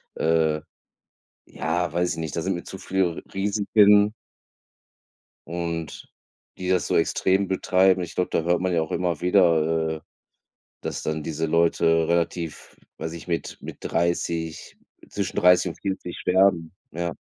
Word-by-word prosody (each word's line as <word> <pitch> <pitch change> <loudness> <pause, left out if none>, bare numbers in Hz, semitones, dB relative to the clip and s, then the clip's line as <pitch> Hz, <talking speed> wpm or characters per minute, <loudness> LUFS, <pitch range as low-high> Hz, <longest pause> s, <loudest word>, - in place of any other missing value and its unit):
äh, 80 -1 +1 0.8
ja, 90 +1 -2
weiß 90 +1 0
ich - - -11
nicht, 80 -3 -4
da 85 - -1
sind 95 0 -1
mir 85 - -6
zu 95 - -8
viele 95 -3 0
R - - -7
Risiken. 105 +1 +4 1.3
Und 85 -1 -5 0.5
die 90 0 -4
das 90 -2 +2
so - - +1
extrem 95 +3 +2
betreiben. 95 0 +3
Ich 85 - -7
glaube, 90 - -1
da - - +1
hört 85 +1 +1
man 90 0 0
ja 80 - +2
auch 80 - -5
immer 85 -3 -1
wieder, 80 -3 +2
äh, - - -11 0.8
dass - - -4
dann 80 0 -2
diese 80 +1 -2
Leute 80 0 +2
relativ, 85 -1 -2 0.2
weiß 80 - -4
nicht, 85 +1 -9
mit, 85 -1 -3
mit - - -9
30, 85 -1 -2 0.3
zwischen - - -4
30 90 0 +5
und - - -11
40 95 -3 -4
sterben, 90 -3 +2 0.2
ja. 85 +1 -3
85 Hz, 155 wpm, -24 LUFS, 80-95 Hz, 1.3 s, 30